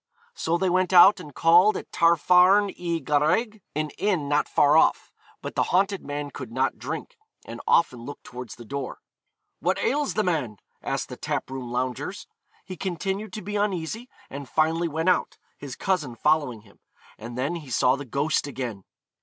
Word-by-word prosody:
So 170 Hz, -, -1 dB
they 190 Hz, +2 st, 0 dB
went 185 Hz, 0 st, +1 dB
out, 185 Hz, +3 st, +8 dB
and 150 Hz, -, -10 dB
called 175 Hz, +8 st, +5 dB
at -, -, -9 dB
Tafarn 180 Hz, +4 st, +4 dB
y 170 Hz, -2 st, -2 dB
Garreg, 180 Hz, +10 st, +1 dB
an 155 Hz, 0 st, -2 dB
inn 185 Hz, -8 st, 0 dB
not 145 Hz, +1 st, +1 dB
far 145 Hz, 0 st, +4 dB
off; 160 Hz, -, +3 dB, 0.3 s
but -, -, -5 dB
the -, -, +1 dB
haunted 195 Hz, +1 st, +1 dB
man 145 Hz, 0 st, -5 dB
could 130 Hz, -5 st, -8 dB
not 130 Hz, +3 st, -1 dB
drink, -, -, -6 dB, 0.3 s
and -, -, -8 dB
often 125 Hz, -7 st, +3 dB
looked 145 Hz, +3 st, -9 dB
towards 125 Hz, -3 st, -9 dB
the 120 Hz, -, -12 dB
door. 140 Hz, +2 st, -5 dB, 0.6 s
'What -, -, 0 dB
ails 290 Hz, 0 st, 0 dB
the 215 Hz, -, +2 dB
man?' 145 Hz, -, -1 dB, 0.2 s
asked -, -, -3 dB
the -, -, -8 dB
tap -, -, -3 dB
room 130 Hz, -3 st, -6 dB
loungers. 125 Hz, 0 st, -3 dB, 0.4 s
He 185 Hz, -1 st, -8 dB
continued 195 Hz, +3 st, -3 dB
to 215 Hz, -, -6 dB
be 205 Hz, +2 st, -3 dB
uneasy, 205 Hz, +4 st, -2 dB, 0.2 s
and 140 Hz, -1 st, -8 dB
finally 160 Hz, +2 st, +1 dB
went 160 Hz, +3 st, 0 dB
out, -, -, +1 dB, 0.2 s
his 135 Hz, -3 st, -7 dB
cousin 155 Hz, -11 st, -1 dB
following 145 Hz, -4 st, +1 dB
him, 100 Hz, -2 st, -22 dB, 0.4 s
and 120 Hz, +2 st, -8 dB
then 140 Hz, +7 st, -1 dB
he 150 Hz, -5 st, -11 dB
saw 125 Hz, +1 st, +3 dB
the 140 Hz, -, -6 dB
ghost 140 Hz, +3 st, -1 dB
again. 120 Hz, -8 st, -6 dB
155 Hz, 180 wpm, -25 LUFS, 135-185 Hz, 0.6 s, out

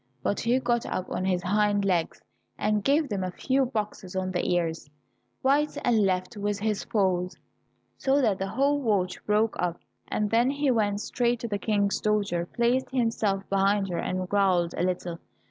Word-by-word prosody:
But 200 Hz, -, 0 dB
he 240 Hz, +2 st, +2 dB
got 240 Hz, -2 st, 0 dB
up 185 Hz, -, -4 dB
on 185 Hz, -, -2 dB
his 180 Hz, -2 st, 0 dB
hind 205 Hz, +1 st, +2 dB
legs, 175 Hz, -4 st, 0 dB, 0.3 s
and 210 Hz, -1 st, 0 dB
gave 290 Hz, +2 st, +3 dB
them 200 Hz, -6 st, -2 dB
a 185 Hz, -, -2 dB
few 265 Hz, +8 st, 0 dB
boxes 210 Hz, -6 st, -4 dB
on 185 Hz, 0 st, -1 dB
the 180 Hz, -, -1 dB
ears, 165 Hz, -3 st, -1 dB, 0.5 s
right 285 Hz, +3 st, +2 dB
and 235 Hz, -2 st, +3 dB
left, 185 Hz, 0 st, -1 dB
with 205 Hz, 0 st, -2 dB
his 210 Hz, 0 st, -2 dB
paws, 185 Hz, -5 st, 0 dB, 0.6 s
so 275 Hz, +1 st, +2 dB
that 215 Hz, -8 st, +2 dB
the 195 Hz, -, -2 dB
whole 280 Hz, +7 st, +1 dB
watch 200 Hz, -7 st, 0 dB
broke 210 Hz, +1 st, +2 dB
up, 175 Hz, -1 st, -1 dB, 0.3 s
and 210 Hz, -1 st, -1 dB
then 235 Hz, +3 st, +4 dB
he 285 Hz, -1 st, +1 dB
went 205 Hz, -3 st, +1 dB
straight 240 Hz, 0 st, 0 dB
to 235 Hz, -, -3 dB
the 205 Hz, -2 st, -2 dB
King's 200 Hz, -2 st, 0 dB
daughter, 200 Hz, -5 st, 0 dB
placed 240 Hz, +4 st, +1 dB
himself 225 Hz, -6 st, 0 dB
behind 195 Hz, 0 st, +2 dB
her, 170 Hz, -1 st, -2 dB
and 185 Hz, +1 st, -2 dB
growled 185 Hz, -4 st, +2 dB
a -, -, -2 dB
little. 175 Hz, -2 st, -2 dB
205 Hz, 180 wpm, -27 LUFS, 185-235 Hz, 0.6 s, then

